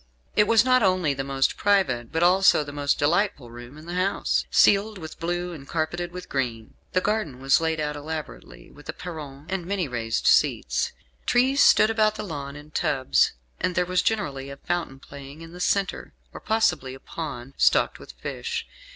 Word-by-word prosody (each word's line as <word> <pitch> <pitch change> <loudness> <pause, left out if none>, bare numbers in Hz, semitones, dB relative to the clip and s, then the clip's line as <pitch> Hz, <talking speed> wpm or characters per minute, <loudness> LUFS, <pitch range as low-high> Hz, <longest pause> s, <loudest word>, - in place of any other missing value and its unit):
It 210 - +4
was 230 +1 +5
not 255 0 +4
only 185 -7 +2
the 135 0 -3
most 135 0 0
private, 180 - +1
but 160 +1 0
also 180 -3 +5
the 145 - -8
most 145 0 0
delightful 145 - 0
room 120 +4 -11
in 155 - -12
the 175 - -6
house 185 +2 0
ceiled 205 +1 +4
with 160 -3 -9
blue 175 +1 -2
and 140 -4 -10
carpeted 170 +2 -2
with 180 0 -8
green. 120 -5 -3 0.2
The 185 - +2
garden 205 - -1
was 135 +3 +3
laid 160 -1 0
out 150 -1 -2
elaborately 155 +1 -8
with 145 +1 -15
a - - -2
perron 150 -6 -8
and 190 -1 -3
many 190 -4 -1
raised 115 -3 -2
seats. - - +2 0.4
Trees 265 +3 +3
stood 215 - +6
about 215 -1 +2
the 215 - -5
lawn 145 -7 -6
in 150 +1 -12
tubs, 135 -3 +2 0.3
and 180 0 -1
there 180 - +2
was 180 0 +1
generally 140 -12 -2
a 140 - -8
fountain 170 -3 -3
playing 140 +2 -11
in 165 0 -10
the 180 - -10
centre, 195 +2 -1 0.2
or - - -8
possibly 175 -12 0
a - - -13
pond, 135 -4 -7
stocked - - +3
with - - -12
fish. - - -5
160 Hz, 190 wpm, -25 LUFS, 140-185 Hz, 0.4 s, stood